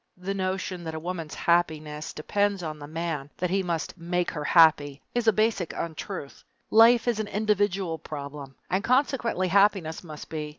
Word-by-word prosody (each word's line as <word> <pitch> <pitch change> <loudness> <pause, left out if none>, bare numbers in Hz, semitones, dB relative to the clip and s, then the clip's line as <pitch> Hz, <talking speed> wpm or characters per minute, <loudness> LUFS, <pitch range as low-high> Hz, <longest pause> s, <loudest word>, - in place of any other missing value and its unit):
The 185 +2 -3
notion 185 -2 -3
that 160 -1 -4
a - - -3
woman's 170 -2 -5
happiness 155 -3 0
depends 200 +4 -1
on 155 -2 -5
the 145 - -8
man 160 -3 -4
that 180 -1 -1
he 195 +1 +2
must 170 -3 -3
"make 175 +1 -1
her 150 -3 -4
happy" 150 -4 +5
is 240 -1 -1
a - - +8
basic 215 -4 0
untruth. 165 -2 -6 0.3
Life 230 +2 +6
is 235 -3 +1
an 215 - -2
individual 205 -5 0
problem, 140 -2 -8 0.2
and 190 +2 +1
consequently 245 -7 +1
happiness 195 -5 +2
must 155 -3 -9
be. 155 -1 -5
175 Hz, 170 wpm, -26 LUFS, 155-200 Hz, 0.3 s, a